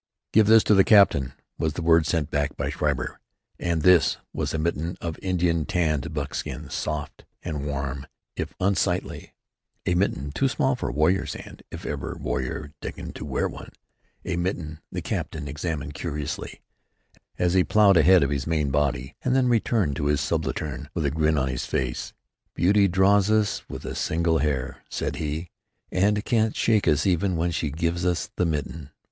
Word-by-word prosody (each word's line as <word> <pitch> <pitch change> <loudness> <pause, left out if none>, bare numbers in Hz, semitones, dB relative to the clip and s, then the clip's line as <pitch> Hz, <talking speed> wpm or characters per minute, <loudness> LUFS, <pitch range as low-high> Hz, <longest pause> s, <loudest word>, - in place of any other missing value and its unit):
"Give 110 -1 +5
this 110 0 +7
to - - +4
the 95 -1 +6
captain," 80 - +5 0.3
was 80 -2 0
the 85 - -4
word 80 -1 +4
sent 80 -2 0
back 75 -1 -1
by - - -2
Schreiber, - - -2 0.4
and 85 -3 -1
"this" 90 -2 +5 0.2
was - - -2
a - - -1
mitten 85 +1 -2
of 85 -2 -5
Indian 90 -3 +1
tanned 80 -2 0
buckskin, 75 -3 -4
soft 75 -1 -4 0.2
and 75 -4 -4
warm 70 -1 -4 0.3
if - - -4
unsightly, 95 0 -1 0.5
a - - +2
mitten 90 -6 0
too 135 - +1
small 130 0 +1
for 125 - -3
a - - -3
warrior's 80 +6 +1
hand, - - -10
if - - -8
ever - - -4
warrior 65 +3 -3
deigned - - -6
to - - -6
wear - - 0
one, - - -9 0.6
a 90 -2 -2
mitten 85 -4 -3
the - - -4
captain 75 -2 -3
examined 75 +1 -4
curiously, 75 -1 -5 0.8
as 90 0 +1
he 95 -1 +5
ploughed 105 -1 +5
ahead 85 +1 +6
of 70 - 0
his 70 0 -2
main 75 -4 0
body, 65 -2 0
and 130 0 +1
then 130 -1 +3
returned 110 - +1
to 70 - -1
his 75 -1 +2
subaltern 75 0 -2
with 75 - -1
a 70 - +1
grin 80 +1 +1
on 65 -1 +1
his 65 -1 -3
face: - - -2 0.4
"Beauty 100 +2 +4
draws 95 +2 +4
us 110 -2 +1
with - - -7
a - - -4
single 80 0 +1
hair," 70 -4 -2
said - - -3
he, 80 +2 -4 0.4
"and 105 +3 +2
can't 110 -2 +1
shake 110 -3 +2
us 75 -2 +3
even 95 0 +2
when 85 +1 0
she 80 -2 -1
gives 85 +4 -1
us 90 -2 0
the 90 - +1
mitten. 75 -1 -4
80 Hz, 180 wpm, -25 LUFS, 75-95 Hz, 0.8 s, this